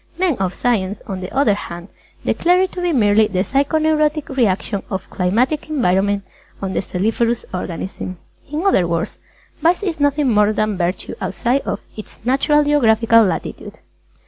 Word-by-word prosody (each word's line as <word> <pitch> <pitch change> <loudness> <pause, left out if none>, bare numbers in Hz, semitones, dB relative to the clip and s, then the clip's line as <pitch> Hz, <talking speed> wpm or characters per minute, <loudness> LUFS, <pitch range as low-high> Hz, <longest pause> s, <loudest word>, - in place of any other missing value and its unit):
Men 360 -4 +1
of 190 -1 -1
Science, 205 -5 0
on 190 -1 -5
the 185 - -6
other 265 -6 +3
hand, 175 -2 -7 0.4
declare 360 +2 +3
it 375 - -2
to 360 - -5
be 355 -1 +1
merely 215 -5 +4
the 185 -3 0
psycho 280 +6 +1
neurotic 305 0 +1
reaction 210 -6 0
of 190 -1 -4
climatic 245 +13 0
environment 200 -7 +1 0.4
on 190 -1 -3
the - - 0
celliferous 225 +5 -1
organism. 185 +1 -5 0.3
In 310 +5 -2
other 190 - +3
words, 170 0 -2 0.4
Vice 345 +5 +2
is 350 -6 -2
nothing 285 -3 +2
more 210 0 +4
than 215 -1 0
Virtue 180 0 -2
outside 240 +8 0
of - - -2
its 215 - -10
natural 280 +4 +3
geographical 230 -6 +4
latitude. 190 - -3
230 Hz, 160 wpm, -19 LUFS, 195-295 Hz, 0.4 s, merely